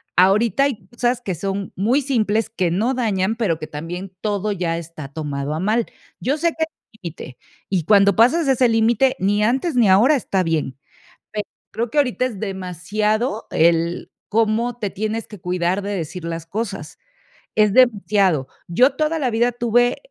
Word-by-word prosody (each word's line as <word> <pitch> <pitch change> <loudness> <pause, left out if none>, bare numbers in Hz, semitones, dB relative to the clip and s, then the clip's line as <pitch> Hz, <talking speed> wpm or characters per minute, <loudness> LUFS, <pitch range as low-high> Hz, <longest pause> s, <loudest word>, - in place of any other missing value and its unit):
ahorita 205 +7 +4
hay 225 -9 -3
cosas 240 +2 -1
que 195 -6 -3
son 195 +3 -4
muy 235 +9 +2
simples, 225 -5 0
que 190 -6 -1
no 220 +9 +1
dañan, 215 -4 0
pero 210 -9 0
que 155 - -7
también 175 +5 -6
todo 210 -1 -1
ya 175 -4 -1
está 165 -3 -8
tomado 145 -1 -4
a 155 - -3
mal. 215 +5 +1 0.3
Yo 275 +4 0
sé 335 +2 +2
que 320 -1 -2
es - - -23 0.3
límite, 160 -7 -8 0.3
y 185 -4 0
cuando 200 0 +5
pasas 275 +8 +4
ese 260 -2 +4
límite, 230 +3 +3
ni 205 +3 +1
antes 265 +8 0
ni 235 -5 +4
ahora 225 +11 +5
está 195 -8 0
bien. 155 -6 -2 0.6
Pero 210 -1 -3 0.3
creo 235 0 -2
que 300 - -1
ahorita 255 -2 +2
es 230 -6 -6
demasiado 205 - -2
el 170 +1 +1 0.2
cómo 225 +2 +1
te 205 -4 -3
tienes 215 +3 -3
que 210 - -11
cuidar 180 +2 -1
de 200 - -4
decir 175 0 -5
las 165 -1 -5
cosas, 195 -5 -5 0.6
es 210 -2 +3
demasiado. 200 - +3 0.2
Yo 250 +11 +4
toda 310 +1 0
la 265 -4 0
vida 235 +2 +2
tuve 240 0 +2
210 Hz, 175 wpm, -21 LUFS, 180-240 Hz, 0.6 s, cuando